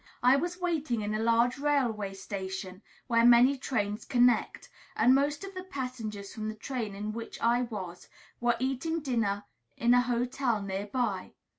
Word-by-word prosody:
I 250 +2 +6
was 350 +5 -2
waiting 310 -10 -1
in 210 0 -2
a 215 - -1
large 230 +3 +2
railway 240 -9 0
station, 190 -1 -6 0.2
where 230 -2 +3
many 245 +3 +7
trains 210 -6 -2
connect; 245 -2 +2 0.3
and 255 - +5
most 285 +5 +1
of 390 0 -7
the 370 - -5
passengers 250 - -5
from 215 -1 -4
the 215 - -5
train 220 -3 -4
in 210 +2 -4
which 230 0 -7
I 240 +1 +3
was 195 -7 -6 0.3
were 240 0 +2
eating 270 +6 -1
dinner 225 -7 0 0.3
in 235 +1 +4
a 245 - +6
hotel 245 -1 0
near 200 0 -4
by. 210 -5 -2
235 Hz, 165 wpm, -29 LUFS, 210-265 Hz, 0.3 s, many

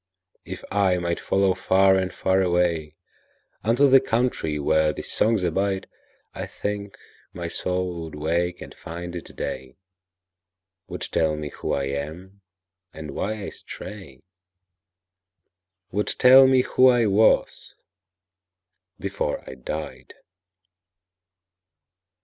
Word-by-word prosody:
If - - -8
I 95 -2 +2
might 85 -1 -2
follow 95 -1 +2
far 95 +1 +3
and 95 0 0
far 95 0 +1
awayUnto 85 -4 0 1.0
the 135 - +9
country 115 -12 0
where 80 +1 +2
these - - -6
songs 110 -3 +2
abide,I 95 +3 -4
think 100 -1 -5 0.4
my 85 -1 -5
soul 90 0 -3
would 80 - -9
wake 85 +4 -1
and - - -11
find 85 +1 -8
it 85 - -9
day, 65 0 -6 1.1
Would - - -7
tell 80 -1 0
me 75 -1 -5
who - - -4
I 70 - 0
am, 80 +8 -6 0.5
and 75 -1 -8
why 105 +7 -3
I - - -4
stray,—Would 95 +2 -11
tell 130 +1 +8
me 130 -1 +4
who 130 - +4
I 120 -2 +4
was 105 +2 +2 1.2
before 100 -6 -3
I - - -7
died. 65 -1 -7
90 Hz, 110 wpm, -24 LUFS, 80-100 Hz, 1.2 s, the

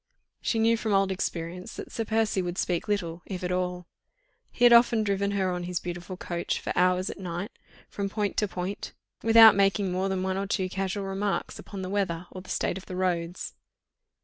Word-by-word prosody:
She 230 - 0
knew 225 +1 +4
from 220 -2 -1
old 195 0 +3
experience 180 -1 -4
that - - -8
Sir 225 - -2
Percy 220 -3 +1
would 175 0 -4
speak 175 -2 -1
little, 175 -5 -2
if 185 -2 -5
at 180 - -1
all: 180 -1 -2 0.6
he 245 - -3
had 240 - +8
often 235 -1 +6
driven 200 -1 0
her 190 -1 +1
on 180 -1 -3
his 180 -1 -2
beautiful 175 +1 -6
coach 175 -1 -2
for - - -3
hours 180 +1 +2
at - - -10
night, 180 +2 -4 0.4
from 200 -1 -3
point 205 -1 -1
to 210 - +2
point, 185 +1 -5 0.3
without 225 -1 +9
making 195 -1 +2
more 185 +2 0
than 190 -1 -1
one 190 0 -1
or 195 0 -2
two 190 -2 0
casual 195 +1 -2
remarks 195 +1 -2
upon 195 -2 -7
the - - -3
weather 185 -4 -1
or 185 - -8
the 185 - -15
state 190 - -1
of 190 - -16
the 185 - -6
roads. 175 -1 -2
190 Hz, 205 wpm, -27 LUFS, 180-200 Hz, 0.6 s, without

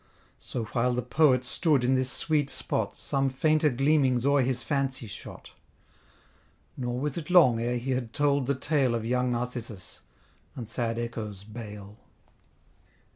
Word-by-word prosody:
So 120 - -4
while 120 +2 0
the 125 - -1
Poet 130 -1 +3
stood 145 0 +2
in 125 +2 +3
this 130 0 +1
sweet 150 -3 0
spot, - - -2
Some 135 0 0
fainter 155 +3 +2
gleamings 135 -1 +2
o'er 140 0 +4
his 125 -1 0
fancy 135 0 -1
shot; 100 - -10 1.2
Nor 125 -1 -3
was 145 +2 -2
it 160 -1 -5
long 130 -11 +6
ere 120 +1 0
he 125 +3 -3
had 125 -3 -2
told 140 -2 +1
the 140 - +1
tale 130 -3 +1
Of 115 -1 -3
young 125 +1 +1
Narcissus, 120 -5 -4 0.5
and 120 -4 -6
sad 115 0 -2
Echo's 110 -4 -5
bale. 105 -1 -10
125 Hz, 150 wpm, -28 LUFS, 120-140 Hz, 1.2 s, long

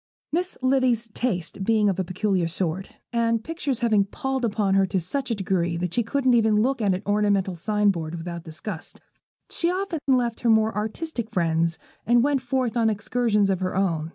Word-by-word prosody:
Miss 360 +3 -1
Livy's 255 -3 +2
tastes 205 -7 -2
being 210 +1 +2
of 195 -2 0
a - - +2
peculiar 185 -1 0
sort, 180 +2 -3 0.2
and 230 -1 +1
pictures 295 -5 -3
having 215 -4 +3
palled 265 +5 -3
upon 210 -3 +1
her 195 0 +4
to 190 - 0
such 265 - -2
a 230 - 0
degree 180 -3 -1
that 175 0 -3
she 240 - +2
couldn't 255 +2 +1
even 220 -2 +4
look 260 0 0
at 195 -3 +2
an 190 - -6
ornamental 205 -2 +1
sign 210 +4 +1
board 165 -2 -4
without 170 0 -6
disgust, 160 -1 -7 0.5
she 340 - 0
often 365 -2 -2
left 245 -4 +2
her 240 - +1
more 220 -1 +3
artistic 225 +3 -3
friends 165 -4 +1 0.3
and 240 0 +4
went 285 -1 +2
forth 255 -2 -1
on 230 -2 +3
excursions 210 -1 +1
of 190 - 0
her 185 -1 -2
own. 165 -5 0
215 Hz, 190 wpm, -24 LUFS, 185-245 Hz, 0.5 s, her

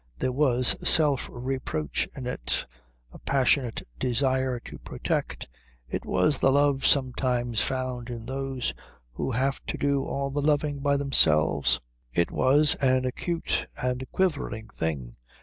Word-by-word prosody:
There 130 - -1
was 125 -2 +3
self 150 -5 +4
reproach 120 - -3
in 130 - -7
it, 125 - -2 0.5
a - - -12
passionate 130 -2 +1 0.2
desire 130 0 0
to - - -10
protect. - - -3 0.4
It - - -5
was 95 +10 +2
the 135 - +4
love 140 -1 +3
sometimes 125 -4 +1
found 130 -2 -3
in 115 -2 -6
those 135 - -3 0.4
who - - -3
have 135 +3 -1
to - - -3
do 140 -1 +1
all 140 0 -3
the 145 +1 -1
loving 145 -1 +1
by 140 0 +1
themselves. 75 - +3 0.3
It 85 - +1
was 145 +3 +4
an 130 -1 +2
acute 165 +6 -2
and 125 0 -2
quivering 145 - -1
thing. 70 -10 -4
130 Hz, 135 wpm, -26 LUFS, 120-140 Hz, 0.5 s, self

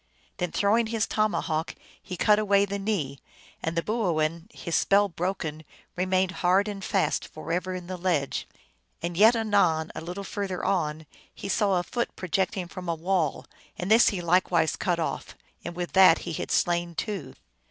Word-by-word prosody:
Then 180 -2 -2
throwing 220 +3 +2
his 225 -1 0
tomahawk 175 -7 -1 0.3
he 180 - -7
cut 210 +3 +4
away 200 -1 +3
the 200 0 -4
knee, 170 -10 -2 0.4
and 165 +1 -3
the 170 - +1
boo 215 -6 0
oin, 165 +5 -1
his 170 - -7
spell 205 +1 +4
broken, 165 -4 -3 0.3
remained 185 0 +1
hard 185 +3 +3
and 200 -2 -5
fast 195 -2 0
forever 180 +4 -3
in 180 -1 -6
the 185 +1 -5
ledge. 170 -6 -1 0.6
And 170 0 -2
yet, 220 +6 +6
anon, 200 -8 +2
a - - -6
little 180 +4 -6
further 195 -2 -4
on, 160 -4 -1 0.3
he - - -8
saw 195 -1 +2
a - - -2
foot 240 +5 -3
projecting 185 0 -1
from 180 0 -7
a 170 - +1
wall, 170 -2 -1 0.3
and 180 +3 -3
this 225 +2 +7
he 195 -5 -3
likewise 170 -2 +2
cut 175 -2 0
off, 165 - -3 0.3
and 170 - -6
with 175 0 -4
that 185 -3 +7
he 170 - -4
had - - -4
slain 175 -1 +1
two. 205 +2 -4
185 Hz, 175 wpm, -27 LUFS, 170-200 Hz, 0.6 s, this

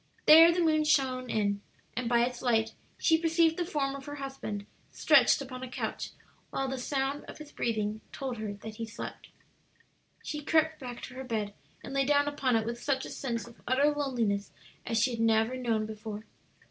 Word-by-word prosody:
There 325 +2 +10
the 345 0 +1
moon 310 -1 +3
shone 260 -4 +1
in, 200 -2 0 0.3
and 240 0 -2
by 235 -1 +4
its 250 0 -5
light 225 -2 +2 0.2
she 320 -1 +3
perceived 330 0 +3
the 355 - -1
form 280 -5 -1
of 275 -1 -8
her 290 - -6
husband 270 -7 -5 0.3
stretched - - +5
upon 255 -1 -8
a 255 - -6
couch, - - -4 0.4
while 270 - -2
the 265 0 -3
sound 275 +2 -1
of - - -10
his 305 -1 -11
breathing 215 -2 -2
told 260 -3 -4
her 215 -1 -4
that 215 +2 -9
he 230 - -3
slept. 220 +2 -8 0.9
She 300 - -4
crept 315 +1 +2
back 245 -2 -7
to - - -7
her 260 +1 -6
bed, 215 -5 -2 0.3
and - - -7
lay 275 0 +3
down 285 +1 +3
upon 275 -4 +1
it 220 -1 +1
with 235 +1 -4
such 270 -2 0
a - - -8
sense 235 -4 -3
of 235 -1 -15
utter 275 +4 +4
loneliness 235 -9 -1 0.4
as 230 - 0
she 230 +4 +3
had 230 - -4
never 225 +2 +3
known 230 -4 0
before. 215 0 -7
255 Hz, 200 wpm, -30 LUFS, 225-285 Hz, 0.9 s, There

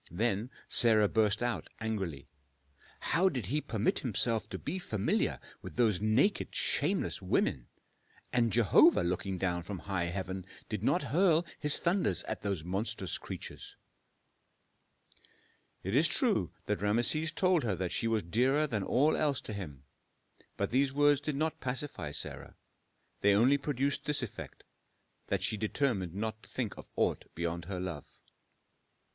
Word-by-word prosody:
Then 110 +5 -1 0.2
Sarah 110 -3 +5
burst 110 +1 +2
out 120 -1 -2
angrily, 95 -10 -3 0.7
"How 185 +3 +2
did 130 - -4
he 145 +10 -1
permit 110 -4 +1
himself 115 -1 0
to - - -5
be 175 +6 -4
familiar 110 - 0 0.2
with - - -9
those 110 -6 +2
naked, 115 - +2
shameless - - +1
women? 60 -3 0 0.7
And 120 -2 +2
Jehovah 115 -6 +5
looking 90 +2 -2
down 90 -2 -1
from 95 +3 -6
high 95 -2 -2
heaven 95 +1 -4 0.2
did - - -3
not - - +2
hurl 170 0 +3
His 150 -1 +5
thunders 170 - +1
at - - -5
those 100 -6 -2
monstrous 95 +6 -3
creatures!" - - -8 2.1
It 95 - -3
is 155 +4 +5
true 230 - +2
that 105 -1 -2
Rameses 120 +10 +2
told 185 -2 +2
her 105 -5 0
that 90 0 -3
she 115 - 0
was 110 -2 +1
dearer 130 - +2
than 115 -8 -2
all 140 +10 +2
else 145 -3 +1
to 110 - -7
him, 75 -10 -7 0.7
but - - -1
these 135 +2 +2
words 145 0 +3
did 150 -1 -2
not 155 +2 -2
pacify 130 +1 -3
Sarah; - - -5 0.6
they 100 0 +4
only 130 +7 +4
produced 140 0 -1
this 145 -3 0
effect, 115 - -8 0.6
that 100 -2 -1
she 110 +1 0
determined 105 - -1
not 110 +1 -3
to - - -17
think 120 -6 -3
of - - -12
aught - - +1
beyond 85 0 -3
her 95 0 -4
love. 90 -6 -6
110 Hz, 150 wpm, -31 LUFS, 95-140 Hz, 2.1 s, Sarah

